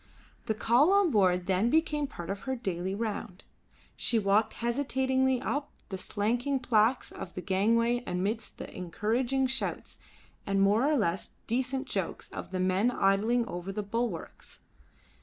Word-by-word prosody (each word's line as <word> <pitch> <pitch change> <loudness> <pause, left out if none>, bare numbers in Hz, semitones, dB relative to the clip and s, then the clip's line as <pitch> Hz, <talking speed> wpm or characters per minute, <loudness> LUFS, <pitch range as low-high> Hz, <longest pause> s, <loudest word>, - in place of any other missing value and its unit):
The 220 - 0
call 245 - +4
on 400 -4 +4
board 180 -5 +3
then 195 +5 +2
became 300 -1 +1
part 175 -7 -6
of 195 - -4
her 265 - +1
daily 190 -5 -3
round. 205 -4 -4 0.5
She 235 - +1
walked 210 +1 +2
hesitatingly 260 +1 +1
up 285 +3 -2 0.2
the 190 - -4
slanting 240 +8 -1
planks 240 0 +2
of 175 - -8
the 180 - -4
gangway 230 +5 +2
amidst 200 +6 -2
the - - -8
encouraging 235 +9 0
shouts 265 +1 -3 0.4
and 195 0 0
more 210 +9 +4
or 300 - +3
less 180 -5 -1
decent 260 +3 -1
jokes - - -3
of - - -6
the 185 - -3
men 185 +5 +2
idling 220 +3 +2
over 175 -2 -5
the 210 +1 -3
bulwarks. 215 -4 -4
225 Hz, 150 wpm, -29 LUFS, 195-255 Hz, 0.5 s, call